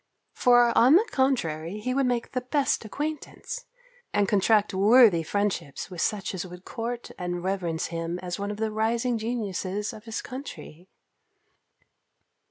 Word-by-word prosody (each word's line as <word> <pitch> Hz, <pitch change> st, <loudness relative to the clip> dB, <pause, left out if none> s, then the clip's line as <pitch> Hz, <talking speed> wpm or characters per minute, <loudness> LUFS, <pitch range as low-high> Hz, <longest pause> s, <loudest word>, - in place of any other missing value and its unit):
For, 245 Hz, -1 st, +4 dB
on 255 Hz, +6 st, +7 dB
the 435 Hz, +6 st, +4 dB
contrary, 185 Hz, -, 0 dB
he 255 Hz, +4 st, -2 dB
would 270 Hz, 0 st, +2 dB
make 245 Hz, -1 st, -1 dB
the 255 Hz, -, -2 dB
best 270 Hz, +1 st, 0 dB
acquaintance, 310 Hz, -, -5 dB, 0.4 s
and 205 Hz, -1 st, +2 dB
contract 210 Hz, +1 st, +3 dB
worthy 205 Hz, -2 st, +6 dB
friendships 195 Hz, -3 st, -2 dB
with 175 Hz, -3 st, -4 dB
such 205 Hz, -2 st, -1 dB
as 185 Hz, -, -3 dB
would 180 Hz, 0 st, -11 dB
court 240 Hz, 0 st, -5 dB
and 175 Hz, -1 st, -3 dB
reverence 180 Hz, -4 st, -1 dB
him 165 Hz, +1 st, -3 dB
as 180 Hz, 0 st, -5 dB
one 200 Hz, 0 st, -3 dB
of 205 Hz, -, -4 dB
the 220 Hz, 0 st, -1 dB
rising 230 Hz, +2 st, 0 dB
geniuses 210 Hz, -3 st, -3 dB
of 215 Hz, -, -12 dB
his 225 Hz, -1 st, -4 dB
country. 180 Hz, -, -9 dB
215 Hz, 150 wpm, -26 LUFS, 185-245 Hz, 0.4 s, on